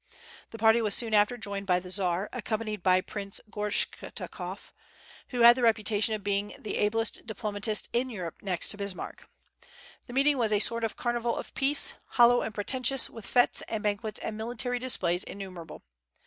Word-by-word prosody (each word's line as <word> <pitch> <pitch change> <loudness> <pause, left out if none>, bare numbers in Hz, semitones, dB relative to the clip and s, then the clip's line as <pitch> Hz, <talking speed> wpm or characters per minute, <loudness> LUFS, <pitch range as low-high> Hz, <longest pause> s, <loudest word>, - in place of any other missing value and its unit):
The 225 - -9
party 225 +1 +4
was 210 -3 +3
soon 230 -2 +2
after 210 +3 +3
joined 200 -3 -5
by 180 -1 +3
the 180 0 -10
Czar, 185 0 -1
accompanied 215 -3 -3
by 185 0 +4
Prince 200 0 -7
Gortschakoff, 210 -2 -4 0.5
who 245 -2 -3
had 235 +1 +9
the 255 - -3
reputation 220 -1 +2
of 210 - -8
being 200 0 -1
the 215 - -4
ablest 225 +2 0
diplomatist 210 -1 -1
in 250 +2 +1
Europe, 180 -8 -6
next 185 -4 +1
to 205 - -2
Bismarck. 200 -2 -6 0.8
The 245 - -9
meeting 275 +1 +3
was 225 -3 +1
a 210 - +4
sort 230 +2 +1
of 225 - -2
carnival 240 -1 -1
of - - -7
peace, 280 +2 +3 0.2
hollow 240 0 +6
and - - -3
pretentious, 255 +5 +1
with 225 - -10
fêtes 245 -1 +4
and 220 -2 -3
banquets 210 +1 -1
and 215 - -4
military 240 +3 -3
displays 185 -8 +1
innumerable. 185 -5 -9
215 Hz, 175 wpm, -28 LUFS, 200-235 Hz, 0.8 s, had